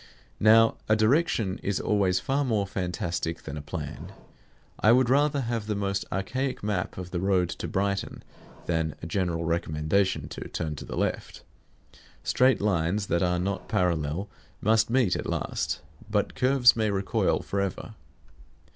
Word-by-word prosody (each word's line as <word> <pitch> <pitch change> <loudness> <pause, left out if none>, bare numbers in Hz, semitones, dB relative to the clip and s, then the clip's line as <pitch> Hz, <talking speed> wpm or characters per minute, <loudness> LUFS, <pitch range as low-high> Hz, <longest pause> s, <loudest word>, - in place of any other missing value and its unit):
Now 115 +1 +6
a 110 - +5
direction 110 - +2
is 100 -1 -1
always 95 -3 +2
far 135 +9 0
more 110 -6 +1
fantastic 85 -3 -3
than 75 - -6
a 75 - -5
plan. 75 - -6 0.7
I 110 - +5
would 125 0 +3
rather 145 +1 +3
have 115 -3 -3
the 105 - -1
most 100 -1 -1
archaic 130 +7 -2
map 100 -3 -2
of 90 -1 -6
the 90 - -2
road 95 -2 +2
to - - -5
Brighton 100 +1 -2 0.4
than 80 -2 -1
a - - -3
general 85 -1 -1
recommendation 85 +3 0
to - - -7
turn 75 -1 -3
to - - -7
the - - -6
left. - - -2 0.8
Straight 130 -1 +3
lines 100 0 +1
that 85 - +2
are 90 -1 +2
not 95 +2 -2
parallel 85 +1 0 0.3
must 110 +1 +3
meet 120 -6 +2
at - - -4
last; - - -2 0.3
but 105 -1 0
curves 130 -1 +5
may 110 -2 +1
recoil 100 -1 0
forever. 100 +2 -3
100 Hz, 155 wpm, -27 LUFS, 90-110 Hz, 0.8 s, Now